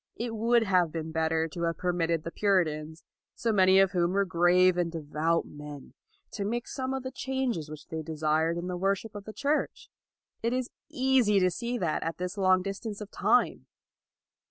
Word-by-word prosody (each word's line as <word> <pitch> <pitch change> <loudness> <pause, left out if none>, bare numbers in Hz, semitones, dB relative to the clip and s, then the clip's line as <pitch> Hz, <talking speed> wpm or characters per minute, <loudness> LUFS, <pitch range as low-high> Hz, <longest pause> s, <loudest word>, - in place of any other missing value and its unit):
It 230 -1 -4
would 230 +1 +3
have 180 -5 +2
been 160 0 -4
better 160 0 +1
to 170 - -7
have 165 -1 0
permitted 170 -3 0
the 165 - -5
Puritans, 160 -6 0 0.3
so 230 - 0
many 190 -2 +5
of 195 -1 +5
whom 175 -1 +1
were 200 0 +2
grave 180 0 +4
and 175 -1 0
devout 160 +1 -1
men, 145 -1 -10 0.4
to 205 - -4
make 235 +4 -2
some 260 -1 -3
of 265 - -4
the 260 - -5
changes 260 - -2
which 155 -1 -9
they 160 0 -5
desired 160 +1 0
in 170 - -4
the 180 0 -3
wor 195 +2 +2
ship 215 +3 -10
of 205 -1 -8
the 215 - -7 0.2
Church. 300 +1 -1 0.5
It 230 +1 0
is 255 -1 -2 0.2
easy 255 -6 +3
to 185 -1 +3
see 240 +6 -3
that 170 -8 -1
at 165 - -3
this 180 +1 -4
long 185 -2 +3
distance 200 +2 -5
of 210 -1 -8
time. - - +1
185 Hz, 195 wpm, -28 LUFS, 165-215 Hz, 0.5 s, many